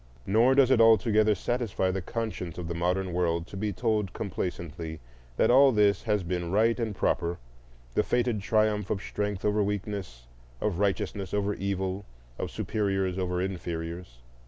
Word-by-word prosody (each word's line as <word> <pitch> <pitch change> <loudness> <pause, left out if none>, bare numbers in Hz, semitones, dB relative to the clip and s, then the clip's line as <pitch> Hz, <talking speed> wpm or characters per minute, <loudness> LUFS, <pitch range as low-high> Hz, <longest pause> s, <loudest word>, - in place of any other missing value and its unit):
Nor 115 +6 +4
does 135 -2 +5
it 120 -3 +5
altogether 110 -1 +5
satisfy 110 -3 -1
the 95 0 -2
conscience 105 -5 -4
of 90 -2 -4
the 85 - -3
modern 90 +2 -1
world 85 -1 0
to 95 - -11
be 105 +2 -2
told 105 -2 -1
complacently 85 -4 -4 0.4
that - - +4
all 135 +2 +7
this 105 -3 +3
has 105 -4 0
been 85 -1 -3
right 115 +4 +3
and 110 -3 -2
proper, 85 -1 0 0.6
the - - +3
fated 120 -3 0
triumph 105 -1 +1
of 100 - 0
strength 105 0 -3
over 105 0 +2
weakness, 100 - -3 0.3
of 95 0 -1
righteousness 100 -1 -1
over 105 0 0
evil, 95 0 -2 0.4
of - - -2
superiors 95 -3 -1
over 90 -1 -1
inferiors. 85 -7 -5
100 Hz, 160 wpm, -28 LUFS, 90-110 Hz, 0.6 s, all